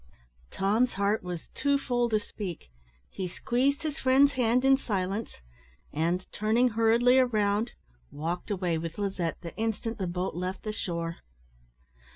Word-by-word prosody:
Tom's 215 +6 +1
heart 200 +2 +1
was 180 -2 -6
too 280 -1 +2
full 245 -3 0
to 220 - +3
speak. 185 - -7 0.4
He 185 - -4
squeezed 265 - 0
his 305 -2 -3
friend's 270 +2 +5
hand 250 -1 +2
in 270 0 +7
silence, 205 -4 -2 0.6
and, 170 +4 0
turning 225 +4 +2
hurriedly 230 +3 +4
round, 215 -2 +1 0.4
walked 165 +7 -4
away 180 -5 0
with 165 0 -5
Lizette 190 -5 -2
the 170 - -8
instant 225 0 -2
the 190 - -1
boat 180 +2 -2
left 180 +2 -4
the 215 - -2
shore. 170 -5 -3
210 Hz, 145 wpm, -29 LUFS, 180-245 Hz, 0.6 s, in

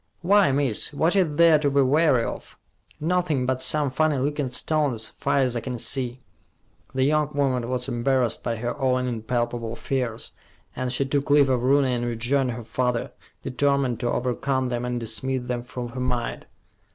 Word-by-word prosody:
"Why, 195 -4 +5
miss, 135 -2 +1
what 165 +6 +2
is 175 -7 +2
there 165 -1 +6
to 145 -1 +1
be 140 0 +3
wary 140 -2 +3
of? - - -7 0.4
Nothin' 160 -5 0
but 130 0 -1
some 150 -2 +2
funny 155 +2 +1
lookin' 145 0 -1
stones, 130 -3 -1
far - - -1
as 130 -3 +2
I - - 0
can 125 +1 -5
see." 125 +1 -2 0.8
The 130 - +2
young 150 +1 +2
woman 130 -4 0
was 125 0 -1
embarrassed 125 -1 0
by 115 - -2
her 120 +2 -3
own 130 -1 +1
impalpable 120 0 -2
fears, 125 -4 -2 0.4
and 130 0 -2
she 135 +2 +1
took 140 +1 -1
leave 145 -1 +5
of 125 -2 +1
Rooney 135 0 +3
and 120 -1 -1
rejoined 120 +2 0
her 120 0 -7
father, 120 +1 -1 0.3
determined 135 -2 0
to 120 - -1
overcome 130 +1 -1
them 120 0 -2
and 125 0 -2
dismiss 125 +3 -2
them 125 -1 -2
from 125 0 -6
her 130 +2 -7
mind. 125 -2 -2
130 Hz, 175 wpm, -24 LUFS, 120-140 Hz, 0.8 s, there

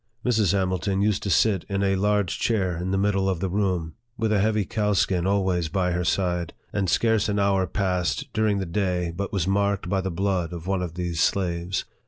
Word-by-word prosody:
Mrs. 110 -7 +3
Hamilton 95 0 0
used 105 -1 +1
to 100 - -3
sit 95 0 +3
in 100 0 0
a 95 0 +2
large 105 -1 +1
chair 95 -6 0
in 90 +2 -3
the 95 - +1
middle 95 -1 +1
of 95 -3 -1
the 95 +1 -1
room, 90 -5 -1 0.2
with 110 -1 0
a 105 - +3
heavy 105 0 +1
cowskin 100 -4 +1
always 95 -4 +1
by 90 +1 0
her 90 0 -1
side, 90 -1 0 0.2
and 100 -3 0
scarce 110 +3 +2
an 100 - 0
hour 100 -2 +2
passed 90 -1 -1
during 110 -2 +1
the 95 - -2
day 90 -1 -1
but 100 +2 -3
was 95 -3 -1
marked 100 -2 0
by 95 0 +1
the 95 - -2
blood 90 -1 -1
of 85 -1 -7
one 95 -1 0
of 85 -2 -4
these 85 -2 -2
slaves. 90 -1 0
95 Hz, 210 wpm, -25 LUFS, 90-100 Hz, 0.2 s, Mrs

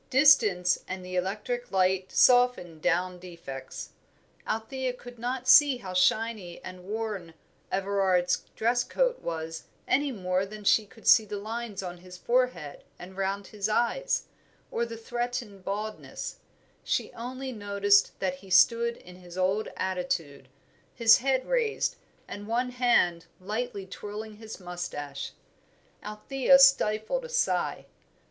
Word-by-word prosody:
Distance 215 -10 +5
and 185 0 -6
the 185 0 -6
electric 210 +7 -2
light 190 0 +1
softened 245 -11 +4
down 180 +1 0
defects. 170 -7 -8 0.6
Althea 250 +4 -2
could 245 -1 -12
not 250 +2 -3
see 290 -4 +7
how 190 -6 -8
shiny 190 -1 +1
and 185 -1 -9
worn 205 -5 -4 0.4
Everard's 190 -2 +1 0.2
dress 240 +2 +1
coat - - 0
was 160 -1 -5 0.2
any 285 +1 +2
more 185 -4 -1
than 210 +2 -8
she 210 +1 +3
could 225 - -18
see 220 - +7
the 210 -1 -6
lines 220 -1 -5
on 180 -1 -6
his 180 0 -12
forehead 235 - -1
and 185 +2 -11
round 195 +1 -2
his 210 +1 -3
eyes, 240 - +1 0.5
or 235 0 -1
the 230 0 -7
threatened 240 -3 -4
baldness; 210 +3 -5 0.5
she - - -1
only 255 +3 -6
noticed 200 -2 +2
that 185 -1 -1
he 190 +1 -15
stood 230 +6 +4
in 180 0 -14
his 180 -1 -12
old 190 +4 +1
attitude, 170 -7 -3 0.5
his 230 -2 +7
head 260 0 +1
raised, 475 -3 0 0.3
and 205 0 -8
one 245 +3 0
hand 240 -9 +2
lightly 210 +1 -4
twirling 210 +2 -8
his 220 -1 -9
moustache. 175 -6 -6 0.7
Althea 260 +6 +3
stifled 270 - +4
a 485 - -8
sigh. 485 0 0
210 Hz, 135 wpm, -28 LUFS, 185-240 Hz, 0.7 s, see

